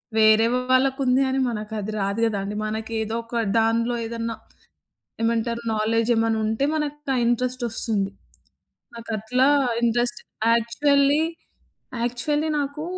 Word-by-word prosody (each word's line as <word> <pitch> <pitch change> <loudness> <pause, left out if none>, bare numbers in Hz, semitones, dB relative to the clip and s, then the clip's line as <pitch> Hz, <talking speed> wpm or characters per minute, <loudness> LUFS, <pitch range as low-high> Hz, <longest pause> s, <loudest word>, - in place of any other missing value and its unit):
వేరే 220 0 +5 0.3
వాళ్ళకుంది 265 0 +2
అని 265 0 0
మనకు 215 -2 -5
అది 210 +1 -4
రాదు 200 +3 -2
గదండీ! 205 -2 -2
మనకేదో 220 +1 -3
ఒక 230 0 -4 0.2
దాన్లో 230 +2 +1
ఏదన్నా 230 0 -4 0.9
ఏమంటారు 230 +1 0
నాలెజ్ 225 +2 0
ఏమన్నా 225 0 +1
ఉంటే 220 +5 -1
మనకు 295 -1 -2 0.2
ఆ - - +1
ఇంట్రెస్ట్ 250 +1 +1
వస్తుంది. 210 -3 0 0.8
నాకట్లా 230 +3 0 0.3
ఇంట్రెస్ట్ 240 +1 +3 0.3
యాక్చువల్లీ, 280 +5 +2 0.8
యాక్చువల్లీ 295 +6 0
నాకు 285 +2 -4
230 Hz, 110 wpm, -23 LUFS, 220-255 Hz, 0.9 s, వేరే